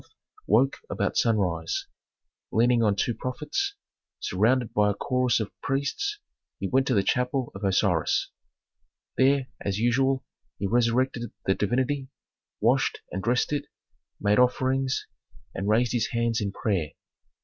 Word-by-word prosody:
woke 125 +6 +3
about 100 -1 -1
sunrise; 90 -8 +1 0.7
leaning 120 +1 +3
on 105 -3 +3
two 120 +4 0
prophets, 150 - -3 0.4
surrounded 115 +6 +1
by 105 0 +3
a 100 - -1
chorus 125 +1 +1
of 110 -2 -3
priests, 140 - -1 0.4
he - - -2
went 135 +1 +2
to 125 - +2
the 100 - +3
chapel 125 +3 0
of 95 - -9
Osiris. 95 -4 +1 0.9
There, 135 0 +3 0.2
as 100 -1 -1
usual, 130 +4 +2 0.3
he 100 - -3
resurrected 120 +2 +1 0.2
the 95 - +3
divinity, 130 +7 -1 0.5
washed - - +2
and 95 - -3
dressed 120 +6 +1
it, 145 0 -1 0.5
made 105 +2 +3
offerings, 130 +1 +1 0.5
and 100 +2 -2
raised 115 +2 +3
his 120 +3 +1
hands 115 -4 0
in 100 -1 -1
prayer. 95 -8 -1
120 Hz, 135 wpm, -26 LUFS, 105-130 Hz, 0.9 s, woke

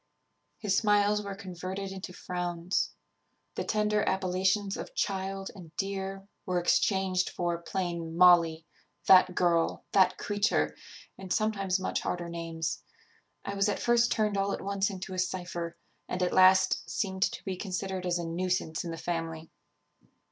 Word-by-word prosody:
His 200 -3 0
smiles 210 0 +3
were 200 -1 -6
converted 190 0 -6
into 190 -1 -7
frowns; 180 0 -2 0.6
the - - -3
tender 210 -1 +1
appellations 190 +2 +1
of - - -7
child 195 0 -2
and 170 -5 -13
dear 195 0 -3 0.2
were 180 -2 0
exchanged 185 +1 +2
for 175 -1 -2
plain 170 -2 -3
Molly, 170 -3 +6 0.4
that 185 -1 +7
girl, 170 -2 +1
that 185 -1 +4
creature, 205 +1 0 0.4
and 190 -1 -8
sometimes 195 -3 +1
much 185 - -1
harder 175 -1 -3
names. 165 -1 -4 0.6
I - - -3
was 200 +1 +2
at 205 - 0
first 240 0 +3
turned 210 -2 +1
all 195 0 0
at - - -4
once 200 0 0
into 190 -1 -6
a 185 - -3
cypher, 175 -2 -3 0.3
and 180 0 -1
at 180 - 0
last 185 0 +5
seemed 190 -3 -2
to - - -8
be 190 -2 -2
considered 185 -1 -3
as 175 0 +1
a 170 - -3
nuisance 175 -1 -1
in 170 - -5
the 165 - -5
family. 165 -1 -4
185 Hz, 150 wpm, -29 LUFS, 175-195 Hz, 0.6 s, that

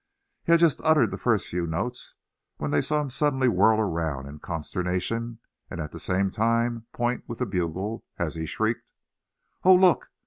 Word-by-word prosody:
He - - 0
had 170 - +7
just 165 -3 +3
uttered 155 -1 +4
the - - -4
first 115 -5 +1
few 85 -1 -3
notes 105 +10 -4 0.4
when 75 - -3
they 75 0 +3
saw 150 0 0
him 140 -3 -5
suddenly 130 -1 +1
whirl 110 -2 +4
around 80 -9 -1
in 75 +2 -10
consternation, 90 +8 -3 0.3
and 85 - -6
at 75 -2 -4
the - - -8
same 95 +1 0
time 115 +1 0
point 120 +1 -1
with 115 - -6
the - - -1
bugle, 95 +3 -3
as - - -2
he 80 -1 -4
shrieked: - - -2 0.7
"Oh! 185 0 +8
look! 180 -1 +4
110 Hz, 180 wpm, -26 LUFS, 85-125 Hz, 0.7 s, Oh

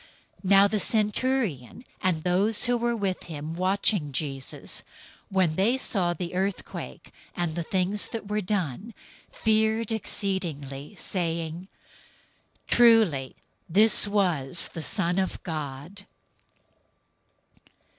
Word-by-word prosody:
027:054 185 - -3
Now 200 0 +7
the 215 +1 0
centurion, 215 - 0 0.2
and 170 -5 0
those 195 +5 +2
who 245 0 +2
were 240 0 0
with 195 -4 -2
him 155 -1 -6
watching 185 -3 +1
Jesus, 135 -1 -3 0.5
when 185 -4 +2
they 210 +9 +2
saw 180 -9 0
the 175 -1 -5
earthquake, 190 +2 -4 0.2
and 175 -2 -1
the 170 - -3
things 190 +4 0
that 225 -3 -6
were 210 +1 -1
done, 195 - -3 0.4
feared 220 0 +1
exceedingly, 175 -8 -3
saying, 170 -1 -3 1.0
"Truly 220 - +4 0.3
this 210 +4 +5
was 175 -8 +1
the 165 - -5
Son 180 +2 0
of 190 - -1
God." 155 +5 -6
190 Hz, 110 wpm, -26 LUFS, 160-210 Hz, 1.0 s, Now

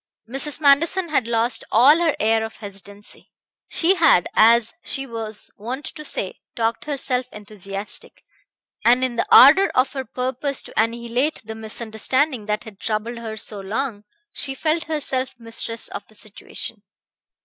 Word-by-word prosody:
Mrs. 275 +5 -2
Manderson 320 +5 +3
had 265 -6 +1
lost 230 0 +1
all 275 +8 +6
her 330 -3 +2
air 220 +1 +2
of 220 - -7
hesitancy. 200 0 -9 0.4
She 345 +3 +3
had, 325 - +4
as 230 +1 +5
she 270 -1 -3
was 225 -3 -6
wont 250 +7 -5
to 305 - -7
say, 195 -9 -3 0.2
talked 230 0 -1
herself 260 -4 -1
enthusiastic, 205 -1 -7 0.6
and 245 +2 +5
in 255 -2 0
the - - 0
ardor 315 +9 +8
of 255 +1 +2
her 265 -2 -3
purpose 260 +3 -2
to - - -11
annihilate 235 +6 0
the 220 - -6
misunderstanding 220 +3 -1
that 210 0 -1
had 215 -4 -12
troubled 225 +2 -3
her 220 -1 -6
so 210 0 -3
long 210 +2 -3 0.3
she 270 -1 -1
felt 320 +3 0
herself 270 -5 -2
mistress 230 0 -4
of 200 - -7
the 215 - -17
situation. 215 +1 -6
235 Hz, 150 wpm, -22 LUFS, 220-275 Hz, 0.6 s, ardor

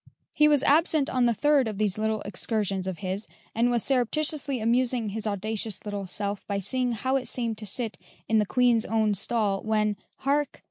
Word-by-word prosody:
He 300 - +5
was 295 -2 +4
absent 310 -1 +3
on 255 -1 +2
the 235 - +3
third 290 -1 +3
of 215 -2 -4
these 210 -1 0
little 220 0 -1
excursions 200 -1 -1
of 185 -2 -3
his, 190 +3 -3 0.3
and 235 +2 +2
was 240 -2 +1
surreptitiously 275 +1 0
amusing 235 0 +1
his 220 +2 -3
audacious 215 +1 -3
little 205 -2 -4
self 200 +1 -3
by 200 - -1
seeing 245 +5 0
how 260 +5 0
it 255 - -3
seemed 230 -3 -1
to 215 - -5
sit 225 +2 -2 0.3
in 220 0 +3
the 210 - +1
Oueen's 245 -2 +3
own 220 -1 +1
stall, 205 -1 +1
when 215 -1 0 0.2
hark! 285 +2 -1
225 Hz, 190 wpm, -26 LUFS, 205-255 Hz, 0.3 s, He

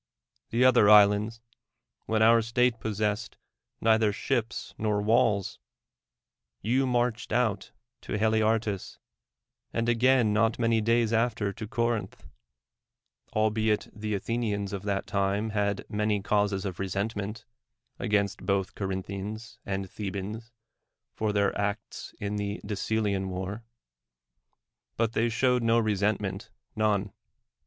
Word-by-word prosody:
the 120 +2 +3
other 120 -5 +6
islands; 105 +2 +5 0.7
when 110 0 +2
our 115 +1 +6
state 115 +1 +1
possessed 105 0 -2 0.4
neither 110 -1 +3
ships 120 +1 -2
nor 105 -1 +1
walls; 105 -2 +2 1.0
you 130 - +1
marched 120 -2 0
out 110 -4 0 0.3
to - - -3
Haliartus, 110 -2 0 0.7
and 115 0 -1
again 120 -1 +3
not 110 +1 +2
many 115 -1 +2
days 115 0 +2
after 110 -3 +1
to 110 0 -7
Corinth; 115 -2 -2 1.1
albeit 110 0 +1
the 105 0 -3
Athenians 105 -2 -2
of 100 - -3
that 100 -1 -1
time 100 +2 0
had 100 -1 -1
many 105 0 0
causes 100 -1 0
of 95 -3 -5
resentment 100 +2 -3 0.5
against 100 -5 0
both 95 0 0
Corinthians 100 +4 -5
and 95 -1 -2
Thebans 105 +4 -6 0.6
for 110 -1 -1
their 100 -1 +1
acts 100 +1 -4
in 105 0 -3
the 100 0 -3
Decelean 100 -1 -1
war; 95 +4 -5 1.3
but 115 -1 +1
they 115 +1 +1
showed 125 +2 +2
no 115 0 +3
resentm.ent, 105 -2 -1 0.3
none. 105 -2 +1
110 Hz, 115 wpm, -28 LUFS, 100-115 Hz, 1.3 s, other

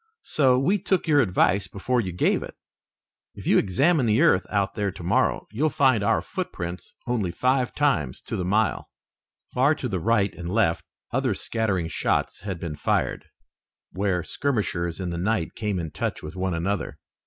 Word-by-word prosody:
So 130 -4 +3
we 185 +10 +2
took 190 -1 0
your 145 -2 +5
advice 100 -2 +2
before 120 +5 -1
you 95 -4 -4
gave 90 - +1
it. - - -8 0.8
If - - -10
you'll - - +5
examine 135 - +2
the 110 +2 +3
earth 170 - +4
out 100 -2 0
there 100 -2 -1
tomorrow 85 0 0
you'll 145 +9 +1
find 130 -7 +3
our - - +2
footprints 85 0 -5
only 115 -7 0
five 125 +7 0
times 85 - +1
to - - -4
the 90 - -2
mile." 105 +5 0 0.6
Far 140 +5 +3
to 130 - -4
the 95 -6 -2
right 100 0 +2
and 85 0 -6
left 95 -4 +1 0.3
other 130 -4 0
scattering 100 -6 -1
shots 85 - -1
had 95 -2 -5
been 80 -3 -4
fired, - - -1 0.7
where 95 -3 0
skirmishers 100 - -1
in 90 -2 -3
the 85 - -3
night 95 -2 0
came 105 -4 -2
in 80 -3 -4
touch 80 - -3
with 75 +3 -7
one 95 -1 -1
another. 90 +1 -2
100 Hz, 175 wpm, -25 LUFS, 90-125 Hz, 0.8 s, your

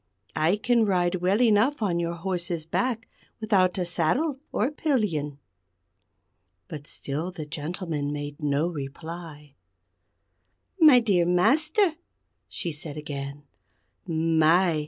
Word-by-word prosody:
I 160 +5 +3
can 235 +2 +2
ride 180 -3 +1
well 190 +4 +2
enough 225 +4 +3
on 175 -4 +1
your 170 0 -2
horse's 170 -2 -3
back 225 +6 -1 0.3
without 195 -5 +2
a 180 - 0
saddle 250 - 0
or 245 +7 0
pillion." 205 - -1 1.3
But 150 -1 -8
still 150 +6 -4
the 160 -4 -7
gentleman 155 -1 -4
made 145 +1 -6
no 145 +2 +1
reply. 155 -1 -8 1.3
"My 300 -7 +8
dear 185 -7 +2
Master," 305 - +3 0.5
she 170 - -3
said 150 -1 -6
again, 140 -1 -6 0.6
"My! 165 +1 +3
175 Hz, 115 wpm, -26 LUFS, 155-210 Hz, 1.3 s, My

